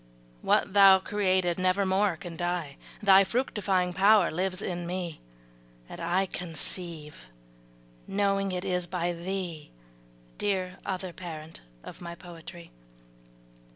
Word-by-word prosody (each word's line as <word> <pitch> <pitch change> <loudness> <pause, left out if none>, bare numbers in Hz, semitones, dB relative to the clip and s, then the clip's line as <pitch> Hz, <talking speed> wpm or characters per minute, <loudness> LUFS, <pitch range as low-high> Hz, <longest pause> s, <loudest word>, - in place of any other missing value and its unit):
What - - +2
thou 195 -1 +8
created 185 -3 0
never 185 +2 +2
more 190 -2 +2
can 170 +1 -8
die, 175 -4 -3 0.3
Thy 195 -1 +7
fructifying 195 -5 0
power 200 0 +5
lives 185 +2 -2
in 175 -3 -4
me 175 -2 -4 0.7
And - - -9
I 175 +3 +1
conceive, 165 - -3 0.8
knowing 195 0 +1
it 180 +1 -3
is 180 -2 -1
by 175 0 -1
thee, 175 -3 -5 0.7
Dear 185 -3 -1
other 185 -2 -3
parent 160 -3 -8 0.2
of - - -11
my 170 -1 -7
poetry! 170 0 -11
180 Hz, 120 wpm, -28 LUFS, 170-195 Hz, 0.8 s, thou